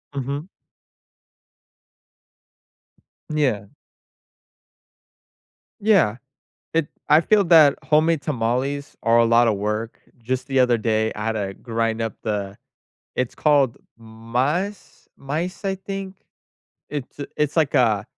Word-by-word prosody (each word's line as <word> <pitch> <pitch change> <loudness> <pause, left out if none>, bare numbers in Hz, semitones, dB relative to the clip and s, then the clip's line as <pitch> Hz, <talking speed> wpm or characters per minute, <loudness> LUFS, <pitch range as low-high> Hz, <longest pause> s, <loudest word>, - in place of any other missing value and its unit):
Mhm. 140 +5 -4 2.9
Yeah. 125 -10 0 2.1
Yeah, 195 - +3 0.6
it 165 -2 +1 0.2
I 150 +2 +6
feel 205 +4 +3
that 160 -4 +7
homemade 155 +2 +2
tamales 135 +2 -2
are 115 +1 +4
a 115 - +5
lotta 115 0 +4
work. 105 +3 -3 0.2
Just 130 +3 -3
the 135 -1 +1
other 125 -2 +4
day, 110 0 0
I 105 - -4
had 115 - +1
to 100 -3 -3
grind 115 0 -2
up 115 -2 -2
the 100 -2 -3 0.6
it's 125 -2 -1
called 140 -5 +2 0.2
mas 125 - -3
maíz, 165 +8 -4
I 195 -1 0
think. 195 0 -6 0.7
It's 145 -1 -6 0.2
it's 150 +1 -1
like 155 -3 +2
a 110 -7 +3
130 Hz, 110 wpm, -22 LUFS, 115-155 Hz, 2.9 s, that